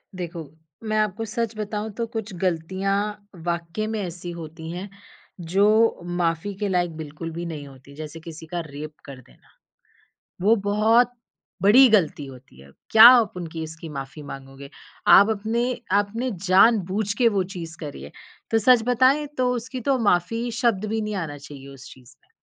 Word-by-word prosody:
देखो, 170 -2 -6 0.4
मैं 215 -1 -1
आपको 215 +1 -1
सच 225 +1 -3
बताऊँ 210 0 -4
तो 230 - -1
कुछ 220 -2 -5
गलतियाँ 185 +2 -1 0.5
वाक़ई 170 +4 -2
में 220 0 -3
ऐसी 175 -1 -6
होती 160 -1 -8
हैं, 180 +4 -6 0.5
जो 205 +7 +2
माफ़ी 175 +2 -1
के 205 - -1
लायक 175 -3 0
बिल्कुल 160 +1 -7
भी 170 +2 -5
नहीं 155 -4 -6
होती, 135 +1 -15
जैसे 155 +1 -8
किसी 160 0 -10
का 175 +2 -4
रेप 150 +1 -8
कर 140 -2 -10
देना। 60 - -24 1.0
वो 225 +2 +6
बहुत 225 +4 +3 0.5
बड़ी 250 +7 +7
गलती 185 -9 +2
होती 130 - -14
है। 70 +1 -16 0.2
क्या 220 0 +9
आप 240 -5 +5
उनकी 165 -2 -6
इसकी 160 +1 -8
माफी 140 0 -7
माँगोगे? 135 0 -10 0.4
आप 200 +3 +7
अपने 220 +3 -1 0.3
आपने 205 +5 0 0.2
जान-बूझ 195 +1 +3
के 240 - +5
वो 200 -4 +1
चीज़ 170 -1 -7
करी 145 - -7
है 70 - -9 0.4
तो 225 - +3
सच 240 +1 +5
बताएँ, 260 +5 +3
तो 255 -4 -1
उसकी 255 +2 -5
तो 265 +2 +1
माफ़ी 230 +3 +1
शब्द 230 -5 +1
भी 220 +1 -1
नहीं 210 0 -3
आना 160 -6 -4
चाहिए 140 -1 -11
उस 135 0 -13
चीज़ 125 -2 -17
में। - - -34
185 Hz, 170 wpm, -23 LUFS, 160-220 Hz, 1.0 s, क्या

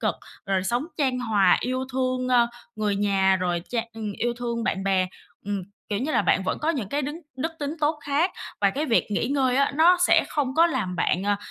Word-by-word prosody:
cực, - - 0 0.3
rồi 190 -1 +1
sống 240 +9 0
chan 260 -4 +1
hòa, 215 -5 +3
yêu 255 +1 -2
thương, 255 -1 -1
ơ, 240 -2 +4 0.3
người 210 -2 0
nhà 195 -2 +3
rồi 175 -2 -1
cha 235 -2 0
ừm, 215 -2 -5
yêu 240 +4 -1
thương 235 -1 -2
bạn 195 0 -1
bè. 190 -1 +2 0.4
Ừm, 200 -2 -2 0.3
kiểu 205 -1 -1
như 280 +6 -2
là, - - +3
bạn 190 - +2
vẫn 185 - -2
có 310 - -2
những 255 - -3
cái 285 +6 -1
đứng 295 +5 -5 0.2
đức 325 +5 -2
tính 290 +2 -3
tốt 300 +1 +1
khác, 290 +6 +1 0.3
và - - +4
cái 295 +3 -2
việc 230 - +2
nghỉ 205 - 0
ngơi 265 -2 +1
á, 280 - +3
nó 340 +4 +6
sẽ 360 - +4
không 275 -3 -1
có 335 +1 +6
làm 210 - -2
bạn, 180 +3 +1
à, 205 0 +2
245 Hz, 230 wpm, -25 LUFS, 200-285 Hz, 0.4 s, nó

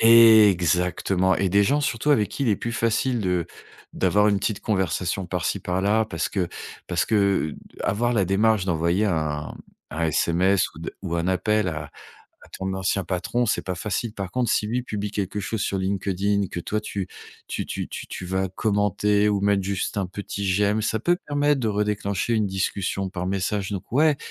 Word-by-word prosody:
Exactement, 95 -5 +5
et 95 - +1
des 100 +3 +4
gens, 145 +8 +2
surtout, 140 +1 0
avec 110 -8 +3
qui 140 - -4
il 125 - +1
est 105 - +3
plus 120 - -4
facile 115 +2 0
de 90 -4 0 0.5
d'avoir 105 +1 +2
une 100 -2 +2
petite 105 0 -1
conversation 95 -2 -1
par-ci, 90 +2 -2
par-là 100 +5 +1
parce 85 -6 -3
que 90 -4 -1 0.4
parce 90 -2 +1
que, 100 -7 +1 0.3
avoir 120 +5 0
la 100 -5 +2
démarche 100 +1 +2
d'envoyer 85 +3 +1
un 75 -5 -1 0.4
un 80 +2 -2
SMS 90 +5 +2
ou 80 - -11
d 80 - -5
ou 85 -3 -3
un 85 +2 0
appel 105 +2 +1
à 75 -3 -5 0.5
à - - -16
ton 95 0 -3
ancien 95 +1 0
patron, 95 +7 -1
c'est - - 0
pas 90 - -3
facile. 105 +5 -3
Par 95 -2 -5
contre, 125 0 0
si 105 - +1
lui 125 +2 -1
publie 105 -3 -4
quelque 100 0 -3
chose 110 +3 -3
sur 100 -1 -1
LinkedIn, 100 +1 0
que 85 - -3
toi, 105 +5 -2
tu 100 -3 -4 0.4
tu - - -3
tu - - -4
tu - - -7
tu - - -7
vas 95 +1 -1
commenter 105 +1 +1
ou 100 -1 +1
mettre 100 -1 +2
juste 100 0 -2
un 100 -2 0
petit 100 +1 -5
j'aime, 100 +3 +2
ça 110 0 0
peut 175 +5 +2
permettre 145 0 +2
de 115 - -1
redéclencher 105 0 0
une 110 -2 +2
discussion 95 0 -2
par 90 -2 -4
message. 100 +1 -1
Donc 95 -3 -6
ouais, 150 +3 +3
100 Hz, 190 wpm, -24 LUFS, 90-105 Hz, 0.5 s, Exactement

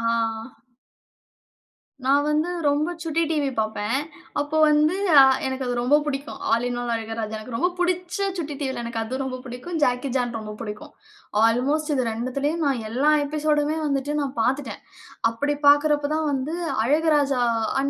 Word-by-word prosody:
ஆ. 230 - -4 2.0
நான் 285 +2 +4
வந்து 305 +3 +1 0.2
ரொம்ப 295 +4 +1
சுட்டி 330 0 0
டிவி 295 -3 0
பார்ப்பேன். 215 +2 -1 0.4
அப்போ 290 +2 -1
வந்து, 300 +3 +3 0.2
அ 270 - +11 0.2
எனக்கு 260 0 -3
அது 245 - -1
ரொம்ப 280 +5 +4
பிடிக்கும். 280 0 -4
All 230 +2 +1
in 245 0 -3
all 240 -1 -2
Azhaguraja. 225 -1 -4
எனக்கு 230 +2 -7
ரொம்ப 355 +9 +2
பிடிச்ச 355 0 -1 0.2
சுட்டி 300 -3 -4
டிவியில 265 -4 -3
எனக்கு 235 -1 -4
அது 245 +4 -4
ரொம்ப 255 -1 -4
பிடிக்கும். 255 +8 -6
ஜாக்கி 250 +2 +1
சான் 245 -2 0
ரொம்ப 215 -1 -7
பிடிக்கும். 210 -2 -7 0.6
அல்மோஸ்ட் 295 +6 0
இது 260 -2 +1
2திலியும் 275 +8 -2
நான் 260 -5 0
எல்லா 275 +6 +2
எபிசோடுமே 300 +1 0
வந்துட்டு 280 0 -1
நான் 275 -1 -3
பாத்துட்டேன். 265 +4 -1 0.5
அப்படி 290 +6 -1
பாக்கறப்ப 290 0 +5
தான் 315 -1 0
வந்து 275 +4 -2 0.3
அழகுராஜா, 290 -2 +2 0.4
அ - - +2
275 Hz, 155 wpm, -24 LUFS, 245-300 Hz, 2.0 s, அ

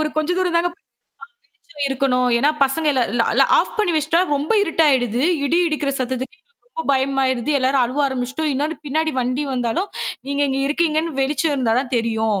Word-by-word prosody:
ஒரு 310 - 0
கொஞ்ச 310 +2 0
தூரம் 360 -2 +1
தாங்க. 340 +1 +2 0.9
வெளிச்சம் 290 - -6
இருக்கணும். 255 -2 +1
ஏன்னா 285 +5 +3
பசங்க 305 +4 -2
இல் 265 - +1
இல்ல 235 0 +2
எல்லாம் - - +3
ஆஃப் - - -1
பண்ணி 390 -5 +1
வெச்சிட்டா 310 +3 +2
ரொம்ப 290 +6 -1
இருட்டா 330 -4 +1
ஆயிடுது. 245 -2 +1 0.2
இடி 325 +5 +2
இடிக்கிற 300 -3 -1
சத்தத்துக்கு 260 +5 -4
எங்களுக்கு 470 +4 -40
ரொம்ப 485 0 -6
பயமா 270 0 +1
ஆயிடுது. 260 +2 -1
எல்லாரும் 265 0 +2
அழுவ 255 +5 -2
ஆரம்பிச்சிடுச்சுட்டோம். 265 +4 -2
இன்னொன்னு 300 +4 -2
பின்னாடி 315 +3 0
வண்டி 255 +4 -1
வந்தாலும், 250 - -1 0.4
நீங்க 280 +1 0
இங்க 270 0 -1
இருக்கீங்கன்னு 315 0 0
வெளிச்சம் 290 +3 0
இருந்தா 245 -5 +1
தான் 265 -1 -7
தெரியும். 220 -3 -1
275 Hz, 185 wpm, -20 LUFS, 255-315 Hz, 0.9 s, ஏன்னா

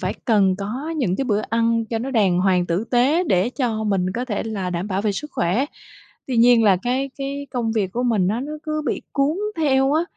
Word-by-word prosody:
phải - - -2
cần 200 -6 +3
có 235 +10 -4
những 205 -11 0
cái 275 - -1
bữa 210 -5 +1
ăn 230 0 +1
cho 225 0 -2
nó 260 +4 -4
đàng 200 -8 +2
hoàng, 180 -2 +2
tử 175 +5 -1
tế 275 +8 +3
để 185 +5 +2
cho 235 -5 -2
mình 195 -3 +1
có 245 - -2
thể 215 -5 -2
là 200 -5 -3
đảm 175 +3 -3
bảo 195 0 -1
về 210 -1 +1
sức 300 +9 -6
khỏe. 185 +10 +1 0.6
Tuy 255 - -2
nhiên 235 0 +5
là 195 -3 +5
cái 260 +3 -1
cái 280 +1 -4
công 235 -3 -1
việc 200 -4 -1
của 245 - -1
mình 220 -7 +2
á, 220 +5 -1
nó 290 +3 -5
cứ 305 0 -2
bị - - -2
cuốn 285 +3 +1 0.2
theo 270 -3 +2
á, 315 +2 +3
230 Hz, 235 wpm, -22 LUFS, 200-270 Hz, 0.6 s, nhiên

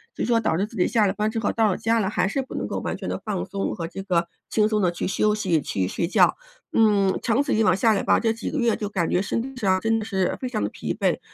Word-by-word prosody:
所 - - -3
以 - - +1
说 235 -1 +3
导 160 -7 0
致 195 - +1
自 225 - -14
己 180 - +2
下 220 -1 +2
了 190 - 0
班 215 +1 0
之 225 0 -3
后 215 - 0
到 225 -2 +2
了 185 - -1
家 230 +1 +1
了， 195 -2 0
还 185 -3 0
是 270 +7 -1
不 260 - -9
能 - - -2
够 - - -3
完 - - -4
全 - - -6
地 - - -4
放 205 -4 -3
松 195 0 -3
和 165 -5 -4
这 195 +3 -7
个 175 -3 0 0.2
轻 215 -1 +2
松 215 -1 0
地 180 - +3
去 175 - -3
休 210 +2 +1
息、 180 -7 +1
去 95 -8 -2
睡 170 - -2
觉。 - - +4 0.4
嗯， 205 -4 +3
长 245 +4 +2
此 280 - -1
以 220 - +3
往 185 -3 +4
下 225 +1 +4
来 200 - 0
吧， - - +3
这 225 -1 +1
几 225 - -5
个 300 - -3
月 235 -2 +2
就 210 - -4
感 180 -5 -1
觉 180 - +2
身 215 - -1
体 270 0 -8
上 190 -2 +2
真 225 +1 +1
的 215 - -5
是 190 -4 0
非 255 - -3
常 220 -4 -2
地 - - -1
疲 - - -5
惫， - - +1
210 Hz, 340 characters per minute, -24 LUFS, 185-225 Hz, 0.4 s, 觉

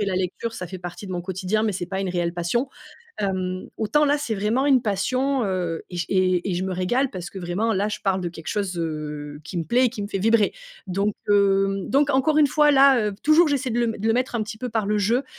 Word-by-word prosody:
et - - +1
la 195 -2 -1
lecture 190 +5 -3
ça 180 - -6
fait 185 +2 -8
partie 175 +3 -8
de 185 - -6
mon 175 -1 -3
quotidien, 190 +3 -1
mais 220 -1 +1
c'est 180 -2 -4
pas 190 +1 -3
une 190 -2 -2
réelle 175 -1 -1
passion. 205 +10 -1 0.5
Hem, 185 -2 -2
autant 225 +8 +2
là 290 0 +3
c'est 245 -7 -3
vraiment 220 +7 +1
une 270 -3 +5
passion, 255 +5 0
heu 180 -4 -2
et 180 - -6
je 175 - -2
et 185 -1 +1
et - - -1
je 175 - -2
me 190 - -2
régale 240 +10 0
parce 175 -3 -7
que 195 - -8
vraiment 185 +6 -1
là 205 +1 0
je 210 - -4
parle 190 -1 +1
de 175 - -2
quelque 165 -1 -11
chose, 195 -4 -2
heu, 150 -2 -5
qui 170 +3 -5
me 165 - -2
plaît 245 - +3
et - - +2
qui 215 -3 -6
me 200 - -4
fait 195 - -2
vibrer. 225 +1 +3 0.3
Donc 200 +2 -1
hem, 195 -1 +2
donc 285 +1 +3
encore 285 +3 +2
une 300 - +6
fois 295 +2 +4
là, 270 -5 +5
heu 205 - -4
p 200 - -22
toujours 315 +1 +6
j'essaie 270 -3 -1
de 230 - -2
le 240 - +2
m 225 - -2
de 215 - -3
le 225 - +4
mettre 250 0 0
un 220 - 0
petit 215 +1 -7
peu 250 +2 -4
par 220 -3 -1
le 210 +1 +1
jeu, 235 +7 +1
200 Hz, 275 wpm, -23 LUFS, 185-240 Hz, 0.5 s, une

